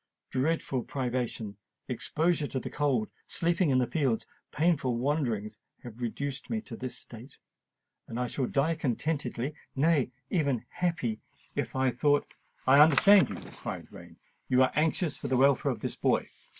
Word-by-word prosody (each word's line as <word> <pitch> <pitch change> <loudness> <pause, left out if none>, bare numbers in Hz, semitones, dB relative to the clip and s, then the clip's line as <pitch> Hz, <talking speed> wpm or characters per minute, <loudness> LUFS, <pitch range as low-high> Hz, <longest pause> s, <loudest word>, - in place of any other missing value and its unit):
Dreadful 135 -1 0
privation—exposure 125 - -2
to 130 - -3
the - - -6
cold—sleeping 150 - 0
in 130 - +3
the 125 - +3
fields—and 125 -2 0 0.2
painful 150 -7 +1
wanderings 120 -6 -1 0.2
have 120 0 -10
reduced 140 +4 -3
me 225 - 0
to 125 - -8
this 130 +1 -5
state. 120 +4 -11 0.7
But 115 - -6
I 125 - 0
shall 125 +1 -2
die 150 +4 +1
contented—nay, 145 0 -1 0.2
even 140 - +1
happy, 165 -11 -1 0.3
if - - -3
I 130 -1 +2
thought——" 145 +4 +1 0.3
"I 135 +2 +7
understand 160 +6 +7
you," - - -4 0.2
cried - - -7
Rain. - - -13 0.3
"You 130 0 +5
are 130 - +2
anxious 155 +1 +1
for - - -5
the 130 - +1
welfare 140 +1 +4
of 110 -4 -6
this - - -2
boy? - - +1
135 Hz, 145 wpm, -29 LUFS, 125-155 Hz, 0.7 s, I